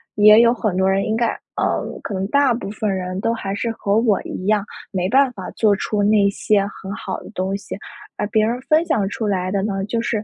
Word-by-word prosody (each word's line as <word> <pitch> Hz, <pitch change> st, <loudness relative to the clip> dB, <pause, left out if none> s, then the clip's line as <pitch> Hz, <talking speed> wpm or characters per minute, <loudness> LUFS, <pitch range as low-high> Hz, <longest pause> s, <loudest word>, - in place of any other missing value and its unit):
也 210 Hz, +1 st, +7 dB
有 235 Hz, 0 st, +5 dB
很 215 Hz, -5 st, -2 dB
多 190 Hz, 0 st, +3 dB
人 195 Hz, +1 st, +2 dB
应 220 Hz, -, 0 dB
该 235 Hz, +1 st, +1 dB, 0.3 s
呃， -, -, 0 dB, 0.2 s
可 -, -, -5 dB
能 190 Hz, 0 st, -2 dB
大 280 Hz, +2 st, +3 dB
部 235 Hz, -4 st, -5 dB
分 215 Hz, 0 st, -2 dB
人 185 Hz, 0 st, -3 dB
都 230 Hz, -, +1 dB
还 195 Hz, -4 st, -4 dB
是 230 Hz, +3 st, -2 dB
和 205 Hz, -2 st, 0 dB
我 220 Hz, -4 st, +2 dB
一 185 Hz, -, -6 dB
样， 210 Hz, -1 st, +2 dB, 0.3 s
没 185 Hz, -2 st, -1 dB
办 265 Hz, +2 st, +4 dB
法 190 Hz, -5 st, -7 dB
做 210 Hz, -2 st, +2 dB
出 210 Hz, +1 st, -2 dB
那 205 Hz, -1 st, +4 dB
些 200 Hz, 0 st, +1 dB
很 195 Hz, -1 st, -9 dB
好 -, -, -5 dB
的 -, -, -11 dB
东 190 Hz, -1 st, -2 dB
西， 200 Hz, -, -8 dB, 0.4 s
而 -, -, -1 dB
别 215 Hz, +1 st, +2 dB
人 235 Hz, +3 st, -1 dB
分 310 Hz, +4 st, +2 dB
享 205 Hz, -, +1 dB
出 215 Hz, +1 st, -3 dB
来 185 Hz, -2 st, -1 dB
的 195 Hz, 0 st, 0 dB
呢， 195 Hz, -2 st, -2 dB
就 230 Hz, +2 st, -1 dB
是 220 Hz, -2 st, -1 dB
210 Hz, 260 characters per minute, -20 LUFS, 195-230 Hz, 0.4 s, 也